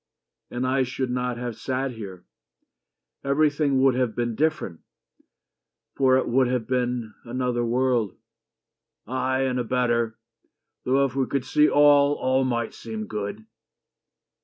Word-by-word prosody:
"And 125 +1 -3
I 130 +1 +2
should 130 0 -2
not 125 -1 -2
have 120 -2 -4
sat 130 0 -2
here. 100 -6 -9 1.0
Everything 145 -1 +2
Would 135 -1 +5
have 125 -3 -1
been 120 -1 -1
different. 145 - -1 1.2
For 130 -1 +4
it 130 - 0
would 130 +1 +3
have 125 -2 -1
been 125 -3 -1
Another 125 0 -1
world." 120 -3 +1 0.9
"Ay, 130 +2 -1
and 130 -1 0
a - - 0
better, 120 -2 0 0.7
though 135 +2 +3
If 130 -1 -4
we 135 -1 +1
could 135 -2 -2
see 150 +2 +4
all 145 0 +5
all 130 0 +1
might 120 -3 -1
seem 110 -1 -6
good." 105 0 -5
125 Hz, 135 wpm, -25 LUFS, 120-135 Hz, 1.2 s, Would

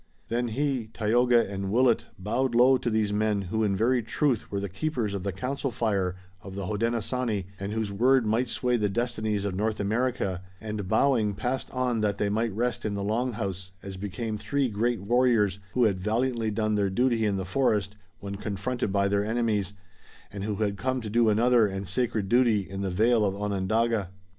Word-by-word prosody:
Then 120 +1 0
he, 130 -1 -1
Tayoga 115 +2 +2
and 95 0 -4
Willet 120 +1 +3
bowed 120 +6 -1
low 125 +2 +6
to 125 -2 -1
these 110 -2 +1
men 105 0 +1
who 110 +4 -1
in 100 -2 +1
very 120 +4 +2
truth 120 +2 0
were 100 - -2
the 100 - -3
keepers 105 - -2
of 100 - -3
the 100 +1 -2
council 130 - -3
fire 100 -6 0 0.3
of 95 0 -9
the 100 -1 -4
Hodenosaunee, 115 0 -1
and 100 +1 -4
whose 110 -2 -2
word 125 +4 +3
might 115 +4 +1
sway 125 +1 0
the 105 -2 +1
destinies 110 -2 -1
of 100 - -1
North 105 +3 -1
America, 105 -3 -1 0.2
and, 105 -3 -5
bowing, 110 -1 +2
passed 130 +4 -2
on 125 -3 -1
that 105 -1 0
they 100 - 0
might 110 +2 0
rest 120 +3 -1
in 105 -1 -2
the 100 - -3
Long 120 +5 0
House, 95 -4 -4
as 95 -1 -6
became 105 +3 -4
three 140 +1 0
great 115 +1 0
warriors 110 -3 +2
who 125 - +3
had 100 -5 +2
valiantly 115 +3 0
done 110 0 0
their 100 -2 +1
duty 120 +2 +1
in 105 -2 +1
the 95 - -3
forest 105 -2 +1 0.2
when 100 0 -6
confronted 105 +3 -2
by 100 0 +2
their 100 0 +1
enemies, 110 -4 0 0.6
and 100 -1 -5
who 105 0 -2
had 100 -1 -1
come 130 +3 -1
to 110 -2 -6
do 115 0 +4
another 115 +1 +4
and 95 0 -5
sacred 110 +1 -1
duty 115 -3 +3
in 95 0 -5
the 100 - -1
vale 110 +5 +3
of 100 -1 0
Onondaga. 105 +1 0
110 Hz, 195 wpm, -27 LUFS, 100-120 Hz, 0.6 s, low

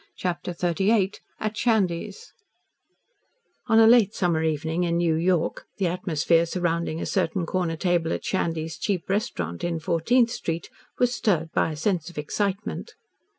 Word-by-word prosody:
CHAPTER 180 0 -3
XXXVIII 190 +4 +1 0.3
AT 215 0 -2
SHANDY'S 220 - -1 1.3
On 225 -2 +4
a 225 - +8
late 225 -3 +5
summer 170 -4 +1
evening 160 +2 -1
in 170 -1 +1
New 170 -1 +2
York 170 +1 0
the 195 - 0
atmosphere 170 -1 +1
surrounding 170 -2 -1
a - - -3
certain 170 +1 0
corner 170 -1 -1
table 170 -2 +1
at - - -3
Shandy's 165 -4 -2
cheap 195 -5 -1
restaurant 90 - -2
in 170 -1 -1
Fourteenth 230 +10 +2
Street 165 -7 -4 0.3
was 245 0 +2
stirred 165 -9 0
by 165 - +1
a - - -5
sense 170 +1 -1
of 175 - -15
excitement. 200 - -3
175 Hz, 150 wpm, -25 LUFS, 165-200 Hz, 1.3 s, a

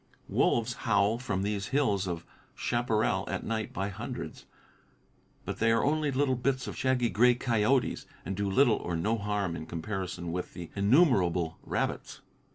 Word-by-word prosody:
Wolves 120 0 +2 0.2
howl 100 +2 +3
from 105 -7 -2
these 100 -1 -2
hills 105 -9 +1
of 85 -2 -4 0.3
chaparral 110 -5 0
at - - -3
night 110 -1 -2
by 95 +2 -2
hundreds, 115 +5 -7 1.0
but - - -4
they 115 +1 +3
are 115 0 +3
only 150 +1 +1
little 135 0 +1
bits 130 +1 0
of - - -6
shaggy, 130 -2 +1
gray 120 +3 +5
coyotes 120 +1 +1 0.2
and 95 +4 -3
do 100 +1 -1
little 115 +2 +4
or 85 - -3
no 105 +8 +1
harm 100 -4 -1
in 80 -1 -7
comparison 90 0 -4
with 90 +1 -4
the 85 -2 -8
innumerable 100 - +3
rabbits. - - -3
105 Hz, 160 wpm, -29 LUFS, 95-125 Hz, 1.0 s, gray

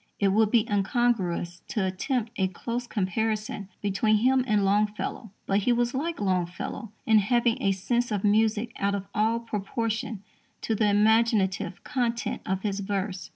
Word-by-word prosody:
It 200 - +3
would 215 +2 +3
be 230 0 +3
incongruous 195 -5 0
to 210 -4 -1
attempt 215 +5 -2
a 190 -2 +1
close 235 +6 -4
comparison 210 0 -2
between 205 +2 +2
him 255 +4 +3
and 210 -3 +2
Longfellow, 210 +2 0 0.2
but 195 +1 +2
he 215 +5 +1
was 240 0 +1
like 320 +5 -2
Longfellow 185 +3 -2
in 220 -1 +5
having 235 +2 +1
a 195 - +2
sense 240 +6 0
of 205 -2 -1
music 215 +2 +2
out 200 0 +1
of 200 -1 -4
all 220 +2 +2
proportion 225 0 -3 0.4
to 225 - -1
the 215 -1 +2
imaginative 210 -3 +2
content 240 -2 -2
of 190 0 -1
his 200 -2 -1
verse. 195 -1 -3
215 Hz, 155 wpm, -27 LUFS, 195-230 Hz, 0.4 s, in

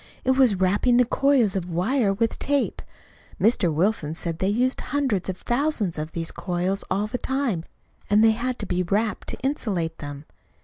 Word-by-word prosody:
It 260 - +4
was 260 -5 +4
wrapping 205 +6 +2
the 250 - +5
coils 250 -5 +2
of 180 -2 -2
wire 200 +6 +1
with 225 +3 -1
tape. 285 -1 0 0.6
Mr. 195 -4 +3
Wilson 160 -1 0
said 165 0 -4
they 190 - +1
used 250 +5 +1
hundreds 255 -9 -1
of 185 - -3
thousands 240 - 0
of 155 +1 -5
these 165 -1 -3
coils 180 +2 -2
all 200 +2 0
the 230 +4 -4
time, 260 -11 -1 0.4
and 210 +2 +5
they 225 - +6
had 245 +3 -2
to 210 - -5
be 180 -1 -1
wrapped 205 +5 -1
to - - -4
insulate 195 - -2
them. 145 0 -7
205 Hz, 180 wpm, -24 LUFS, 180-250 Hz, 0.6 s, they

